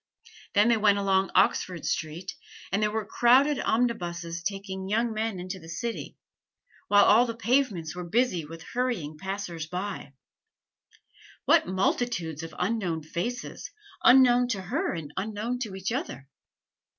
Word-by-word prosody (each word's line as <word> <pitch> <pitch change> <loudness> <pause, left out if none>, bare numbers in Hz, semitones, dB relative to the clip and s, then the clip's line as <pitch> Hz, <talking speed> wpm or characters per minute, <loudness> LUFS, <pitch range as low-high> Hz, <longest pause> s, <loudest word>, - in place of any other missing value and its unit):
Then 205 +3 +5
they 235 - +4
went 205 -1 +4
along 195 -1 +2
Oxford 180 -2 +2
Street; 165 +3 -3 0.4
and 200 +2 +1
there 210 - +2
were 220 0 -2
crowded 255 +7 +4
omnibuses 175 -8 -1
taking 190 0 -4
young 225 +2 +1
men 215 -3 -2
into 185 +1 -6
the 165 -1 -13
city, 230 +8 -5 0.7
while 205 0 +6
all 235 +4 +6
the 230 - -4
pavements 225 - 0
were 180 - -5
busy 185 -1 +1
with 165 +2 -10
hurrying 235 -11 -2
passers 190 -4 -5
by. 180 -4 -5 1.3
What - - +4
multitudes 185 -4 -1
of 165 -1 -8
unknown 180 -5 -1
faces, 180 +11 -5 0.3
unknown 250 -1 +6
to 210 -6 -2
her 285 - -1
and 155 -4 -6
unknown 215 +5 -3
to 215 -6 -4
each 190 +3 -3
other! 140 - -4
200 Hz, 140 wpm, -27 LUFS, 175-235 Hz, 1.3 s, while